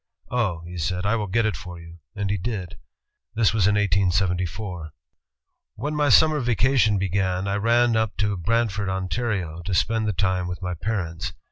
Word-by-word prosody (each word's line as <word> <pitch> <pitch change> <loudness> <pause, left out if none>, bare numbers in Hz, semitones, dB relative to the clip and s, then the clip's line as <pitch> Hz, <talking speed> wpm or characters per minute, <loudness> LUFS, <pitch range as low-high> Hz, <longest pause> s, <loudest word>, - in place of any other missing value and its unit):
'Oh,' 105 -9 0
he 90 0 -7
said, 90 +3 -1
'I 110 +3 +2
will 105 -2 -2
get 115 +4 +1
it 110 -5 0
for 90 +1 -8
you,' 85 0 -13 0.2
and 100 -1 -1
he 100 - +1
did. 95 -3 -5 0.6
This 110 -2 +3
was 105 -4 +3
in 105 - +3
1874, 90 -3 0 0.8
"When 150 +1 -3
my 150 -1 +2
summer 155 +5 +5
vacation 120 -3 +2
came, 95 +1 0 0.3
I 100 - 0
ran 115 +2 +3
up 110 -2 0
to 100 +1 +1
Brant 115 +5 +1
ford, 100 0 -3
Ontario, 95 -2 -2
to 95 +2 -2
spend 110 +4 +1
the 105 - 0
time 90 0 0
with 90 0 -5
my 90 0 -2
parents. 85 -2 -3
100 Hz, 180 wpm, -24 LUFS, 90-110 Hz, 0.8 s, summer